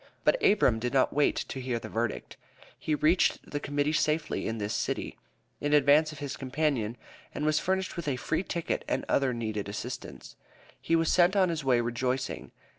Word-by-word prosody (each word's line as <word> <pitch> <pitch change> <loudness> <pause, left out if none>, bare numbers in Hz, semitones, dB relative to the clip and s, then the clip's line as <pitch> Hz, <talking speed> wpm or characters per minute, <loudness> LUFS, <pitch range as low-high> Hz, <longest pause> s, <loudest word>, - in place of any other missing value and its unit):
But - - +3
Abram 130 - +4
did 125 +2 -2
not 130 - +3
wait 145 0 +3
to 130 - -5
hear 125 -2 -2
the 115 - -7
verdict. 115 0 -3 0.4
He 155 - 0
reached 155 +4 +2
the 145 - -2
Committee 145 +1 -1
safely 155 0 0
in 115 - -2
this 105 0 -3
city, - - -2 0.4
in 145 0 -1
advance 150 +2 +5
of 155 - -10
his 140 -1 -5
companion, 130 -4 -1 0.4
and 150 - -2
was 155 0 +3
furnished 190 0 -1
with 170 - -4
a 140 - +1
free 155 +6 -1
ticket 170 -3 -3
and 130 - -1
other 135 -2 +2
needed 110 -4 -3
assistance, 105 - -7 0.5
and 165 - +5
was 165 -1 +1
sent 180 +2 +4
on 190 -2 +4
his 165 -3 -2
way 125 -3 +3
rejoicing. 125 +2 -2
145 Hz, 190 wpm, -29 LUFS, 125-155 Hz, 0.5 s, advance